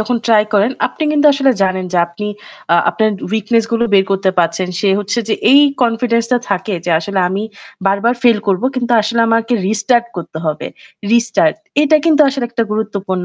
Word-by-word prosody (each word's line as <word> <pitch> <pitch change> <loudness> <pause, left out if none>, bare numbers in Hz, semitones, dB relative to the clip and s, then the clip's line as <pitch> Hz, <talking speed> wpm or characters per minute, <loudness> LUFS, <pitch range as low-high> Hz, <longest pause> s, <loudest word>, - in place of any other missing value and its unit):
যখন 235 +3 -1
try 220 -2 +4
করেন, 205 +5 +2
আপনি - - -7
কিন্তু 300 0 +3
আসলে 275 -1 +2
জানেন 185 -1 0
যে 175 - +1
আপনি 190 +5 -7 0.5
আ - - +5 0.2
আপনার 220 -1 0 0.2
weakness-গুলো 230 +1 0
বের 190 -1 +4
করতে 195 -1 +1
পারছেন। 175 +2 0
সে 200 - +1
হচ্ছে 205 +4 -3
যে - - +1 0.2
এই 285 - +7 0.2
confidence-টা 230 +1 +1
থাকে 195 +1 -2
যে 175 - -2
আসলে 190 +3 -3
আমি 195 +3 -3 0.4
বারবার 200 +5 +1
fail 235 -4 +4
করব 195 +3 +1
কিন্তু 245 -1 -2
আসলে 230 +2 -1
আমাকে 230 +1 0
restart 230 +3 +1
করতে 165 -2 -7
হবে। 155 - -3 0.4
Restart 235 +7 +2 0.3
এটা 310 +1 +4
কিন্তু 310 -2 +3
আসলে 270 -2 -3
একটা 235 -1 -1
গুরুত্বপূর্ণ। 200 -4 -3
220 Hz, 175 wpm, -15 LUFS, 195-240 Hz, 0.5 s, এই